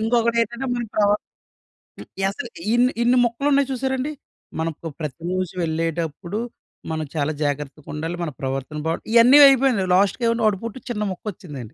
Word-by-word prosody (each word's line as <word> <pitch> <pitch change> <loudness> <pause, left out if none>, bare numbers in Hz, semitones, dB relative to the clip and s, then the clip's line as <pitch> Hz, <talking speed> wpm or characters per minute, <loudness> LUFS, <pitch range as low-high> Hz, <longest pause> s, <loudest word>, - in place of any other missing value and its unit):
ఇంకొకటేటంటే 235 +2 +1
మన 240 -1 -2
ప్రవ 205 -1 +3 0.9
హ్మ్. - - -10 0.2
అసలు 195 +1 -2 0.2
ఇన్ని, 245 +1 +4
ఇన్ని 245 +2 +4
మొక్కలున్నాయి 275 +3 +1
చూశారండి? 265 +2 -1 0.5
మనకు 165 0 -4
ప్రతి 155 0 -6
రోజు 185 -1 -2
వెళ్ళేటప్పుడు 165 +3 -2 0.5
మనం 155 -1 -2
చాలా 150 0 0
జాగ్రత్తగుండాలి. 150 +3 -4
మన 160 - -3
ప్రవర్తన 135 +2 -3
బావ్ 165 - -1
ఇయన్నీ 240 +5 +8
అయిపోయినియి. 260 -7 +3
లాస్టుకేమన్నా 230 +4 +2
వాడు 200 -3 +1
పొట్టు 230 +3 -6
చిన్న 210 -3 -2
మొక్కొచ్చిందండి. 180 -6 -8
205 Hz, 135 wpm, -22 LUFS, 160-240 Hz, 0.9 s, ఇయన్నీ